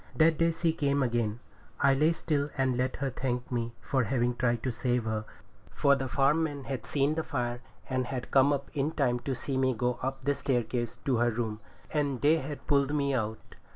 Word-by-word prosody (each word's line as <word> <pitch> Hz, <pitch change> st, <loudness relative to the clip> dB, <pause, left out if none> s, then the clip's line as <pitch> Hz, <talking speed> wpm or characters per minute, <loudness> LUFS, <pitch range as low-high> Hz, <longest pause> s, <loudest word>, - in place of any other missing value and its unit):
That 160 Hz, 0 st, +4 dB
day 165 Hz, 0 st, +4 dB
she 165 Hz, 0 st, 0 dB
came 140 Hz, -3 st, +1 dB
again. 120 Hz, -2 st, -1 dB, 0.4 s
I 140 Hz, -1 st, +5 dB
lay 150 Hz, +4 st, +4 dB
still 150 Hz, -3 st, -1 dB
and 130 Hz, -2 st, +2 dB
let 130 Hz, +1 st, 0 dB
her 135 Hz, -1 st, -2 dB
thank 125 Hz, -1 st, -3 dB
me 120 Hz, -1 st, -2 dB
for 130 Hz, -3 st, 0 dB
having 120 Hz, +1 st, +1 dB
tried 120 Hz, -2 st, 0 dB
to 130 Hz, -, 0 dB
save 120 Hz, 0 st, 0 dB
her; 110 Hz, -1 st, -2 dB, 0.4 s
for 140 Hz, -1 st, +3 dB
the 135 Hz, -1 st, -2 dB
farm 140 Hz, +5 st, +3 dB
men 145 Hz, -3 st, -2 dB
had 130 Hz, -4 st, -5 dB
seen 140 Hz, +1 st, +1 dB
the 160 Hz, -, -1 dB
fire, 120 Hz, -4 st, -3 dB, 0.3 s
and 130 Hz, -1 st, -1 dB
had 125 Hz, -2 st, -5 dB
come 135 Hz, +1 st, +5 dB
up 140 Hz, -1 st, -2 dB
in 150 Hz, +1 st, 0 dB
time 125 Hz, -4 st, +1 dB
to 130 Hz, +2 st, -3 dB
see 135 Hz, +2 st, -3 dB
me 130 Hz, -1 st, +2 dB
go 125 Hz, +2 st, -1 dB
up 135 Hz, +1 st, -3 dB
the 145 Hz, -, +3 dB
staircase 120 Hz, -3 st, -1 dB
to 130 Hz, -3 st, +2 dB
her 120 Hz, +1 st, +3 dB
room, 110 Hz, -2 st, -2 dB, 0.3 s
and 145 Hz, -4 st, 0 dB
they 155 Hz, +3 st, +5 dB
had 145 Hz, +1 st, -7 dB
pulled 140 Hz, 0 st, +2 dB
me 140 Hz, -1 st, +1 dB
out. 110 Hz, -3 st, -3 dB
130 Hz, 215 wpm, -29 LUFS, 120-145 Hz, 0.4 s, I